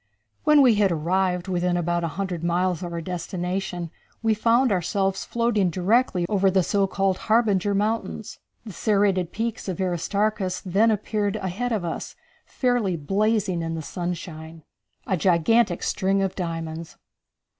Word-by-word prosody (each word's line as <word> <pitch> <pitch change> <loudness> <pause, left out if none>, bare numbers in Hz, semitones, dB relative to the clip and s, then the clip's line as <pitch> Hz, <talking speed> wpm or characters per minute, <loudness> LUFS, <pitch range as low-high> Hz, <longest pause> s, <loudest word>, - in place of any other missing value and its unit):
When 300 -2 +6
we 250 -3 +6
had 205 -3 +3
arrived 180 +3 0
within 180 -1 0
about 175 0 0
a - - 0
hundred 185 -4 -3
miles 175 0 0
of 175 -2 -5
our 170 0 -4
destination 180 0 -4 0.3
we 225 -1 +3
found 235 +3 +3
ourselves 195 +1 0
floating 230 -5 +1
directly 185 +1 +1
over 195 -1 +2
the 190 -1 +2
so 200 +2 +1
called 195 -1 0
Harbinger 205 -3 +3
Mountains. 215 0 -2 0.3
The 210 - -8
serrated 195 -4 +1
peaks 225 -1 -3
of 185 0 -3
Aristarchus 190 +2 -1
then 200 +5 +3
appeared 210 -1 -1
ahead 195 +7 -3
of 210 -6 -1
us, 165 - -5 0.3
fairly 245 -8 0
blazing 195 +2 0
in 165 0 -3
the 160 - -5
sunshine. 165 -2 -6 0.4
A 190 - 0
Gigantic 180 +3 +2
String 195 0 +1
Of 190 -1 -1
Diamonds. 165 -2 -5
190 Hz, 145 wpm, -24 LUFS, 175-210 Hz, 0.4 s, When